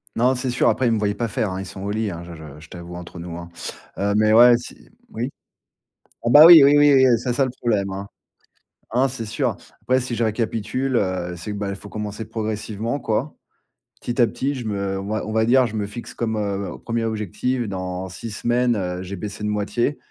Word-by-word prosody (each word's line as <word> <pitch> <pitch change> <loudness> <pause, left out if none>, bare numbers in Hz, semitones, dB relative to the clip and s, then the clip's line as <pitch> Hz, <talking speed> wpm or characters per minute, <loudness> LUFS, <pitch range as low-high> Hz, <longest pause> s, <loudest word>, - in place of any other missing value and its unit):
Non, 125 +3 +3
c'est 125 0 -2
sûr, 125 - +3
après, 130 - +1
ils - - +3
me 110 - +1
voient 105 -1 +1
pas 115 +2 -2
faire, 110 -1 -1
hein. 95 +1 -4
Ils 95 - -5
sont 95 +1 -9
au 100 - -4
lit, 105 -1 -1
hein, 85 0 -7
je 85 -1 -9
je 80 - -11 0.2
je 75 - -15
t'avoue, 85 0 -9
entre 90 0 -9
nous, 85 0 -7
hein. 85 0 -9 0.5
Heu, 100 +1 0
mais 110 0 +3
ouais, 120 +2 +8
si, - - -10
mmh - - -21 0.3
oui? 120 +5 -2 0.9
Ah 120 - +2
bah, 150 +5 +10
oui, 170 -3 +11
oui, 140 +1 +6
oui, 145 -1 +6
oui, 130 -1 +6
heu, 120 -2 +5
c'est 125 +2 -2
ça, 135 +2 +2
le 130 - -4
problème, 110 -6 -1
hein. 100 +1 -6 0.8
Ah 120 - 0
non, 135 - +4
c'est 120 -3 -5
sûr. 110 +2 -1 0.2
Après, 130 +1 +2
si 125 -1 -3
je 115 - 0
récapitule, 115 +4 -1
heu, 90 -4 -1
c'est 90 +5 -6
que, 105 - -4
bah, 100 -1 -3
il 100 - -3
faut 100 +1 -11
commencer 105 +1 -5
progressivement, 110 +2 -3
quoi. 115 +7 -2 0.7
Petit 120 +1 -2
à 120 - +6
petit, 140 +4 -2
je 120 -4 -6
me 100 -2 -2
on 95 - -6
va 110 0 -2
on 110 - -5
va 110 0 +2
dire, 130 +1 +5
je 110 - -7
me 105 -1 -1
fixe 120 +4 -8
comme, 110 -2 -2
heu, 100 -1 -3
1er 115 -1 -1
objectif 110 +3 -2
dans 95 -1 -4
6 115 +5 -7
semaines, 120 +2 +1
heu 90 -2 -3
j'ai 95 +1 -6
baissé 105 +2 -6
de - - 0
moitié 105 +6 -1
110 Hz, 245 wpm, -22 LUFS, 100-120 Hz, 0.9 s, oui